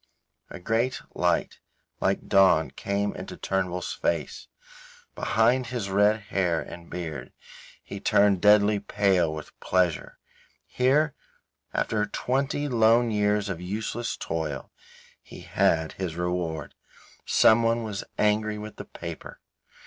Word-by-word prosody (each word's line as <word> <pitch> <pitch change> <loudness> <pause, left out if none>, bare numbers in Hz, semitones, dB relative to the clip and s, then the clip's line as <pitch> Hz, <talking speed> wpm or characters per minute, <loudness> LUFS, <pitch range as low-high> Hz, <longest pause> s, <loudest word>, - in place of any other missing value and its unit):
A - - -9
great 115 +7 0
light - - 0 0.4
like 95 +1 0
dawn 95 -7 +4
came 100 +1 -2
into - - -8
Mr. - - -32
Turnbull's 90 -2 -1
face. - - -2 0.7
Behind 120 +3 +2
his 120 -6 -4
red 105 +2 +3
hair 95 -4 0
and 85 -1 -9
beard 85 -3 -6 0.5
he - - -7
turned 100 -2 +3
deadly 105 0 +5
pale 95 -5 +1
with 75 -1 -7
pleasure. 90 -3 0 0.5
Here, 140 +4 +2 0.6
after 105 -1 0
twenty 140 +3 -1
lone 115 -1 +4
years 105 0 +1
of 90 -3 -4
useless 110 +5 -3
toil, 75 -5 -4 0.5
he - - -12
had 80 -1 +1
his 90 -4 -5
reward. 85 -4 -3 0.5
Someone 115 +1 +4
was 105 -3 -4
angry 105 0 +1
with 105 0 -8
the - - -7
paper. - - -9
100 Hz, 120 wpm, -26 LUFS, 90-110 Hz, 0.7 s, deadly